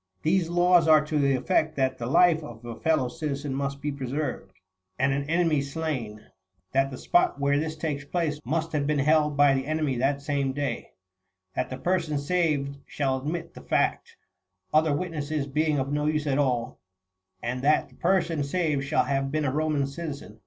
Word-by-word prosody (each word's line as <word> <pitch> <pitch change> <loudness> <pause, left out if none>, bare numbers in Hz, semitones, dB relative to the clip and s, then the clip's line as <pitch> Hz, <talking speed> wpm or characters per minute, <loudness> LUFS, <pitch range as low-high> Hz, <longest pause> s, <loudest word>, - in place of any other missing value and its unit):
These 165 +1 +2
laws 175 -1 +4
are 155 -1 +6
to 150 0 -1
the 140 -1 +3
effect 155 +2 +1
that 130 -1 0
the 115 - -3
life 165 +4 +4
of 120 -4 -10
a 120 -1 -6
fellow 155 -5 +2
citizen 145 -1 -4
must 140 0 -3
be 150 - -1
preserved, 135 -6 -4 0.5
and 135 +1 +2
an 140 +1 -3
enemy 165 -3 +2
slain; 135 -7 -4 0.5
that 135 +1 +2
the 130 - -7
spot 350 - +2
where 140 0 +2
this 155 0 -3
takes 155 -3 -3
place 150 -1 -2
must 160 +5 -1
have 145 -2 0
been 150 0 +1
held 150 +1 +2
by 145 -1 +6
the 135 0 -1
enemy 155 -4 0
that 135 +3 +1
same 140 -2 -1
day; 140 -4 -4 0.6
that - - -1
the 130 - -5
person 165 -1 0
saved 145 -3 0
shall 135 -2 -1
admit 165 +4 -4
the - - -11
fact, - - -1 0.6
other 155 0 +4
witnesses 155 -2 -2
being 150 +2 0
of 135 0 -1
no 150 0 0
use 155 0 0
at 140 -1 +1
all; 125 -4 0 0.6
and 125 +2 -2
that 150 +1 +2
the 125 - -21
person 170 -4 +1
saved 150 -2 0
shall 140 +2 +2
have 135 -1 -1
been 155 0 0
a 130 - +1
Eoman 150 -1 0
citizen. 140 -7 -7
145 Hz, 190 wpm, -26 LUFS, 135-155 Hz, 0.6 s, are